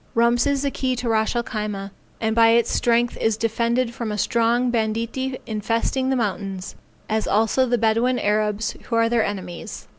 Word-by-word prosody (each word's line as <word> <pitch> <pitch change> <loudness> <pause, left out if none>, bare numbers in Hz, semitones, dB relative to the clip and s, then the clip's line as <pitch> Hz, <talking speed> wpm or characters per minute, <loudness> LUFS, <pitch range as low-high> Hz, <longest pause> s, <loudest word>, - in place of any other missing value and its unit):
Rumps 235 +2 +3
is 280 -1 0
the 280 - 0
key 255 -1 -1
to 245 -1 -3
Ras 220 +1 +1
el 240 - +1
Khyma, 210 -4 -4 0.3
and 220 0 0
by 230 -1 +6
its 230 0 +3
strength 240 0 +2
is 220 -1 +1
defended 235 +2 0
from 230 -2 -4
a 210 - -3
strong 235 +3 +1
banditti 230 +3 -1
infesting 230 +4 -1
the 265 - +2
mountains, 195 -4 -3 0.3
as 220 0 -1
also 225 +5 +2
the 245 0 +2
Bedouin 230 +3 +2
Arabs 210 0 0
who 230 - -2
are 230 0 +3
their 235 -1 +2
enemies. 190 -4 -6
230 Hz, 180 wpm, -22 LUFS, 215-240 Hz, 0.3 s, by